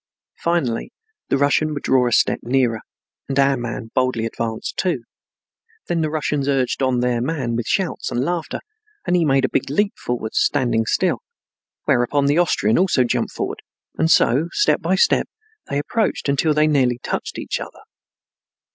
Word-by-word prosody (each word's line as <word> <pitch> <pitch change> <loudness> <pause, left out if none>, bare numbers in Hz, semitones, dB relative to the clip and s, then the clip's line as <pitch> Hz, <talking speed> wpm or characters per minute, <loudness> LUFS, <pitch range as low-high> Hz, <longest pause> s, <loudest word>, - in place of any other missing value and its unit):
Finally 170 - -1 0.4
the - - +2
Russian 145 +2 +2
would 145 - -5
draw 130 -2 +3
a - - -1
step - - +3
nearer, 120 -2 +1 0.5
and 135 - -2
our 140 0 +4
man 120 -2 -5
boldly 130 -3 +1
advanced 115 -1 -4
too. 170 -10 0 0.8
Then 170 -1 -1
the 155 - 0
Russians 150 -2 -1
urged 135 -2 0
on 130 -2 +1
their 125 -1 +1
man 130 -4 -2
with 115 -1 -3
shouts 190 -3 -1
and 120 - -2
laughter, 175 -1 -3 0.4
and 180 - +1
he 175 - +3
made 135 -3 +3
a - - -1
big - - -1
leap 200 +8 +1
forward, 115 -3 -4
standing 120 -6 +1
still, 185 - +1 0.7
whereupon 140 +1 +2
the 145 +4 +3
Austrian 115 -9 +2
also 180 -8 +3
jumped 120 - -1
forward, - - -4 0.3
and 160 - +1
so, 145 0 +4
step 415 - +2
by - - +1
step, 470 - +2 0.4
they 140 - -1
approached 210 +7 -1
until 145 +2 +2
they 150 0 +4
nearly 130 -5 +2
touched - - -4
each - - -3
other. - - -9
135 Hz, 170 wpm, -21 LUFS, 120-155 Hz, 0.8 s, our